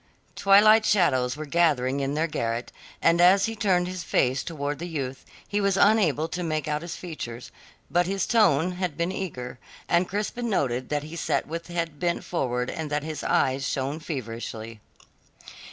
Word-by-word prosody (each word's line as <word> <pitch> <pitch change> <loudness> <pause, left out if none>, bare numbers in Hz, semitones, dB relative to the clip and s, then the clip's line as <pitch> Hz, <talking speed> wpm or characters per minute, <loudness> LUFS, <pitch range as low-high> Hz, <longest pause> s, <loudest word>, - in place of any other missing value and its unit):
Twilight 215 +3 +6
shadows 130 -11 +2
were 155 - -5
gathering 140 -4 +2
in 140 +1 -1
their 155 +2 +1
garret, 115 -6 -3 0.3
and 170 +1 +4
as 185 +3 +6
he 225 0 -3
turned 190 -4 +1
his 185 0 -5
face 130 -4 +1
towards 145 -4 -4
the 175 - -4
youth, 135 -6 -4 0.2
he 205 0 -1
was 200 -1 +2
unable 190 -8 +3
to 180 - -4
make 155 -4 -2
out 150 0 -1
his 170 0 -6
features; 125 -9 -7 0.4
but 175 0 +2
his 195 0 0
tone 180 - +3
had 180 -4 -3
been 170 +2 0
eager, 125 -11 -5 0.3
and 175 +1 +2
Crispin 215 +4 -2
noted 130 - -1
that 145 -1 -1
he 155 +2 -8
sat 170 - 0
with 165 +2 -5
head 165 -4 -3
bent 175 -1 -1
forward 125 -7 -2
and 160 -2 -5
that 145 0 -1
his 155 -2 -5
eyes 130 +1 +1
shone 140 +3 -2
feverishly. 115 -6 -6
160 Hz, 175 wpm, -26 LUFS, 135-180 Hz, 0.4 s, Twilight